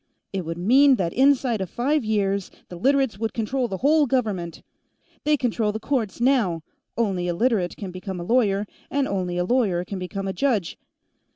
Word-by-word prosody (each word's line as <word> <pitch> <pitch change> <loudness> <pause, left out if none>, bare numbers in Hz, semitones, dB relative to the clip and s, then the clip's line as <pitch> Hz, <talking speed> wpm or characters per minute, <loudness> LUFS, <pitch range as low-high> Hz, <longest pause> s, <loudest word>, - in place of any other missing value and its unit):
It 190 -2 -2
would 165 +1 -4
mean 260 +9 +5
that 175 -6 -2
inside 260 -4 +3
of 190 - -3
five 280 - 0
years, 200 -3 0 0.2
the 180 - -8
Literates 265 +1 +1
would 225 0 -3
control 245 +3 -1
the 195 - -4
whole 300 0 +4
government. 210 -10 -2 0.6
They 300 0 +3
control 230 -4 0
the 220 - -5
courts, 235 -5 -2
now 235 - +2 0.3
only 195 -6 0
a 175 - -1
Literate 210 -4 0
can 195 -3 -6
become 185 0 -6
a - - -4
lawyer, 205 -1 +2 0.2
and 280 -1 0
only 180 -3 -2
a 180 - 0
lawyer 195 -7 +1
can 195 +1 -5
become 195 +2 -4
a 190 - -2
judge. 230 -10 -1
215 Hz, 185 wpm, -24 LUFS, 185-255 Hz, 0.6 s, mean